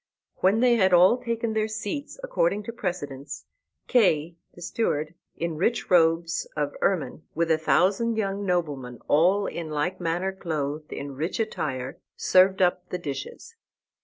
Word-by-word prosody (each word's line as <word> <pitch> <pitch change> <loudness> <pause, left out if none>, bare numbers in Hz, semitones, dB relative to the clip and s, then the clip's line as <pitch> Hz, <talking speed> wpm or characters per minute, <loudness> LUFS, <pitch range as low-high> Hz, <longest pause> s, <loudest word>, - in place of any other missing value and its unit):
When 200 +5 +3
they 245 -1 +5
had 190 -3 +3
all 180 +6 +6
taken 230 -1 -2
their 215 0 +1
seats 220 - -5
according - - 0
to 230 - -6
precedence, 175 - -5 0.4
Kay, 170 - +2 0.2
the 175 - -13
sewer, 155 -8 -1 0.3
in 165 -2 -3
rich 220 +6 0
robes 165 -1 +3
of 145 -1 -1
ermine, 160 -8 0
with 165 0 +1
a 160 - +4
thousand 200 +8 +2
young 200 -1 -1
noblemen 145 - -2
all 185 +7 +4
in 165 -4 -5
like 155 +5 -2
manner 175 +3 -1
clothed 155 -4 -4
in 140 0 -5
rich 155 +10 -3
attire, 135 - -3 0.2
served 190 +1 +4
up 180 0 0
the 180 - -2
dishes. 140 - -7
180 Hz, 150 wpm, -26 LUFS, 155-205 Hz, 0.4 s, all